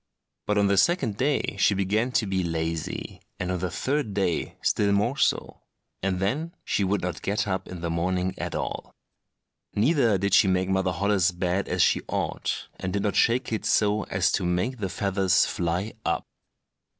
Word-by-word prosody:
But 105 - +1
on 100 - +4
the 100 0 +2
second 125 - +2
day 135 -5 0
she 100 - +4
began 105 +6 0
to 125 - +2
be 95 -2 0
lazy, 80 -1 -3 0.2
and 90 0 -2
on 90 - -1
the 90 +1 -2
third 125 - -2
day 95 -4 -1
still 100 -1 +2
more 105 +6 +2
so, - - 0 0.4
and 95 -1 -1
then 150 - -1
she 100 - +1
would 95 0 0
not 90 -3 -3
get 100 +1 -1
up 95 -1 -2
in 90 -2 -8
the 85 - -2
morning 90 +2 0
at - - -3
all. - - -4 0.8
Neither 115 -2 +3
did 100 +1 -1
she - - +6
make 95 0 +1
Mother 95 -1 +1
Holle's 95 +1 +2
bed 90 +2 -1
as - - +2
she - - +3
ought, - - -2
and 95 - -3
did 100 +1 -1
not 105 - 0
shake 120 0 +2
it 110 - -2
so 105 0 +2
as 95 0 +1
to 95 - 0
make 90 +9 -1
the 95 -3 -2
feathers 95 -2 +2
fly 90 +5 -2
up. 85 - -1
95 Hz, 185 wpm, -26 LUFS, 90-105 Hz, 0.8 s, she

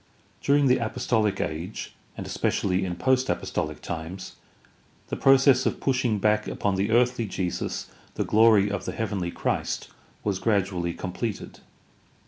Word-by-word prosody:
During 140 0 +3
the 130 -1 +4
Apostolic 110 -3 0
Age, 85 +6 -4 0.2
and - - -5
especially 95 0 0
in 90 -1 -3
post 130 +6 +2
apostolic - - -2
times, 85 +3 -6 0.8
the - - -2
process 135 -1 +5
of - - -2
pushing 125 -5 +1
back 105 +1 +2
upon 100 - -1
the 95 +2 0
earthly 120 0 +2
Jesus 95 -2 -3 0.3
the - - -1
glory 110 -2 +5
of 100 0 -3
the - - -3
heavenly 100 -6 -2
Christ - - -2 0.3
was 100 -3 -1
gradually 95 -5 0
completed. 100 +3 -5
105 Hz, 135 wpm, -26 LUFS, 95-125 Hz, 0.8 s, process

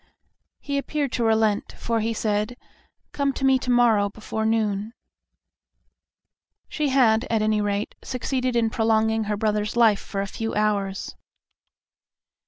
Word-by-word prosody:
He 280 -1 -2
appeared 285 -1 -2
to 240 - -1
relent, 220 -2 +1
for 230 -1 -2
he 225 +1 -1
said, 215 +1 -1 0.5
"Come 280 -1 0
to 270 - -2
me 265 -1 +4
to 250 - -5
morrow 230 -4 +4
before 220 +1 -4
noon." 215 -1 0 1.7
She 300 -2 -1
had, 235 -4 +3
at 225 -2 +1
any 215 0 +1
rate, 205 0 -2
succeeded 255 0 -2
in 225 -2 +2
prolonging 220 0 +1
her 210 0 -2
brother's 210 0 -1
life 225 -4 +4
for 195 - -5
a 195 - -1
few 225 +3 -4
hours.' 200 -2 -1
220 Hz, 140 wpm, -24 LUFS, 210-240 Hz, 1.7 s, me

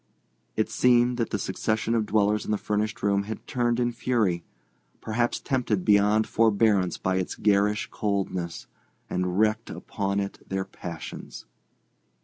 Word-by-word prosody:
It 110 - +1
seemed 120 0 +3
that 115 -2 -1
the - - -1
succession 110 +4 -1
of 110 -2 +1
dwellers 105 0 +2
in - - -8
the 105 - +2
furnished 105 +1 -2
room 100 0 +2
had 110 +1 -6
turned 120 -1 0
in 120 0 +1
fury—perhaps 115 +1 -2
tempted 120 -8 0
beyond 105 +1 +4
forbearance 105 -4 +2
by 95 0 0
its 95 - -2
garish 105 +1 +2
coldness—and 90 -2 -3
wreaked 110 +1 +2
upon 100 -1 -3
it 100 0 -4
their 95 0 -1
passions. 85 -3 -8
105 Hz, 130 wpm, -26 LUFS, 100-115 Hz, -, beyond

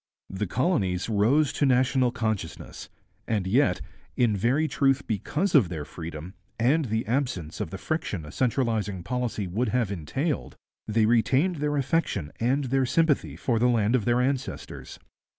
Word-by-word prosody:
The 95 +2 -2
colonies 100 - 0
rose 125 +8 +3
to - - -1
national 130 0 +3
consciousness, 110 -8 -4 0.4
and 105 -4 0
yet, 125 +10 +2 0.4
in 115 -4 +3
very 130 +10 +1
truth 140 -2 +1
because 145 - -1
of 125 - +5
their 80 -4 -5
freedom, 85 +2 -8 0.2
and 135 +7 +2
the 110 -1 -1
absence 110 - -2
of - - -3
the 95 - -6
friction 100 - -3
a 75 - -9
centralizing 110 -7 0
policy 125 -2 -2
would 105 +7 -1
have 120 -3 0
entailed, 130 - -3 0.3
they 110 0 +2
retained 130 +10 +2
their 145 0 -1
affection 130 - 0
and 130 +5 +1
their 135 0 +1
sympathy 160 +1 +1
for 115 -3 0
the 125 +2 +3
land 115 0 +2
of 115 -5 0
their 120 +1 +3
ancestors. 135 0 -3
120 Hz, 155 wpm, -26 LUFS, 100-135 Hz, 0.4 s, of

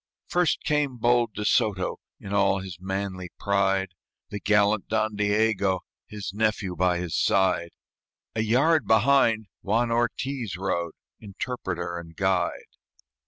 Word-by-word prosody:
First 175 -1 +1
came 150 -3 +1
the - - -11
bold 120 -2 +2
De 105 - -3
Soto, 95 -4 +1 0.2
In 100 0 -7
all 100 -1 +3
his 95 -3 -8
manly 95 -1 -4
pride, 95 -1 +1 0.4
The 105 - -4
gallant 105 0 +2
Don 110 0 0
Diego, 105 -2 +1 0.3
His 105 -3 -6
nephew, 105 -3 0
by 90 +1 +2
his 85 -4 -3
side; 90 -3 +2 0.6
A 110 - -1
yard 140 +9 +3
behind 115 -1 +4 0.2
Juan 115 +4 +1
Ortiz 120 -2 -1
rode, 85 -3 -2 0.3
Interpreter 95 -5 -4
and 85 -1 -12
guide. 95 -1 0
100 Hz, 130 wpm, -26 LUFS, 95-110 Hz, 0.6 s, behind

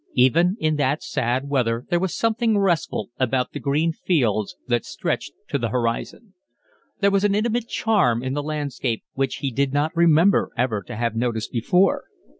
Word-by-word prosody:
Even 165 - +4
in 155 -4 +1
that 145 +1 0
sad 130 -1 -1
weather 125 -4 0
there 175 - +3
was 190 0 -2
something 225 -1 +1
restful 170 - 0
about 130 0 0
the - - -6
green 150 +4 +1
fields 115 - 0
that 120 -2 +1
stretched - - -3 0.2
to 140 - 0
the 115 -2 -1
horizon. 125 - -3 0.7
There 200 0 +4
was 195 0 +2
an 205 -1 +3
intimate 230 +2 0
charm 175 - +1
in 130 0 -2
the 145 - -1
landscape 145 -6 -3
which 135 -1 -1
he 135 - 0
did 140 +2 0
not 150 +4 0
remember 170 +3 +4
ever 115 -4 0
to - - -6
have 115 0 -1
noticed 115 -2 -2
before. 180 - +2
140 Hz, 175 wpm, -23 LUFS, 120-180 Hz, 0.7 s, Even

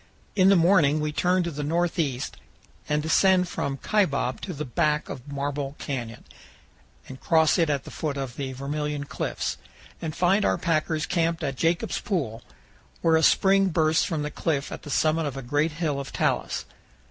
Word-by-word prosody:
In 190 -2 +5
the 200 - +6
morning 165 -4 +4
we 150 0 -1
turn 180 +4 +2
to 170 - -3
the 150 -1 -5
northeast 160 -4 -1 0.5
and 150 0 +1
descend 180 +3 +4
from 140 -5 -3
Kaibab 145 -9 0
to 190 - -5
the 150 -2 -4
back 150 +4 0
of 135 +2 -8
Marble 140 0 -3
Canyon 120 -5 -5 0.8
and 130 0 -9
cross 160 +1 +3
it 165 -2 +3
at 140 -2 0
the - - -10
foot 150 -3 -3
of 135 -3 -4
the 135 -2 -4
Vermilion 145 +2 -3
Cliffs, 145 - -3 0.4
and 160 -1 -4
find 190 +4 +3
our - - +2
packers 155 -2 0
camped 165 -2 0
at 135 -1 -2
Jacob's 165 +5 0
Pool, 140 - -2 0.6
where 165 -1 +4
a 160 - +4
spring 195 +4 +4
bursts 160 -2 +2
from 160 -5 -2
the 150 - -4
cliff 145 -3 -2
at - - -6
the - - -10
summit 155 +2 +1
of 135 -2 -5
a 135 - -5
great 145 +5 0
hill 155 -3 -1
of 140 - -6
talus. - - -1
155 Hz, 180 wpm, -25 LUFS, 140-170 Hz, 0.8 s, the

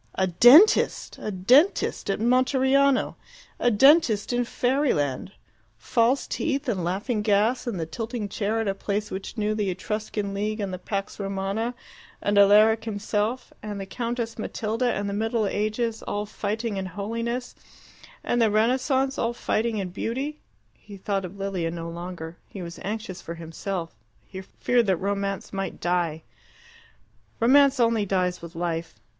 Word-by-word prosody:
A 190 - +2
dentist! 245 - +5
A - - -4
dentist 245 - +3
at 195 - +1
Monteriano. 265 +3 +3 0.4
A 245 - +3
dentist 245 -2 +4
in 245 0 +1
fairyland! 245 - 0 0.5
False 235 - +1
teeth 280 -2 -2
and 195 -8 -1
laughing 205 +6 -1
gas 215 +5 +1
and 210 -7 -2
the 160 - -2
tilting 225 +5 -4
chair 210 +2 -1
at 225 - -1
a 195 - +1
place 205 +1 -3
which 190 +4 -6
knew 215 0 0
the 210 -2 -1
Etruscan 205 +1 -3
League, 210 +2 -2
and 195 -2 -3
the 185 - -5
Pax 195 +2 -4
Romana, 200 +4 -2 0.4
and 205 - 0
Alaric 215 +3 +6
himself, 215 +3 -2
and 210 -1 -5
the 195 - -5
Countess 235 +2 -4
Matilda, 225 +3 -1
and 205 0 -2
the 200 - -3
Middle 225 +1 0
Ages, 215 +3 -1
all 205 0 -3
fighting 210 0 -3
and 190 - -4
holiness, 230 +6 -4 0.7
and 240 - +1
the 225 - +4
Renaissance, 260 +5 +1
all 230 +1 0
fighting 225 -1 -1
and 180 -3 -4
beauty! 270 +9 -3 0.3
He 205 -1 -13
thought 195 0 -2
of 185 +3 -9
Lilia 195 -4 -2
no 165 0 -5
longer. 170 -1 -7
He 195 - -8
was 170 0 -8
anxious 205 -4 -5
for 170 - -7
himself: 165 +1 -5 0.3
he 190 0 -8
feared 235 +4 0
that 190 -2 +2
Romance 200 +1 -3
might 195 0 -4
die. 170 -3 -1 1.2
Romance 275 +3 +5
only 230 -3 +2
dies 180 -1 0
with 170 0 -10
life. 165 -1 -3
210 Hz, 155 wpm, -25 LUFS, 195-235 Hz, 1.2 s, Alaric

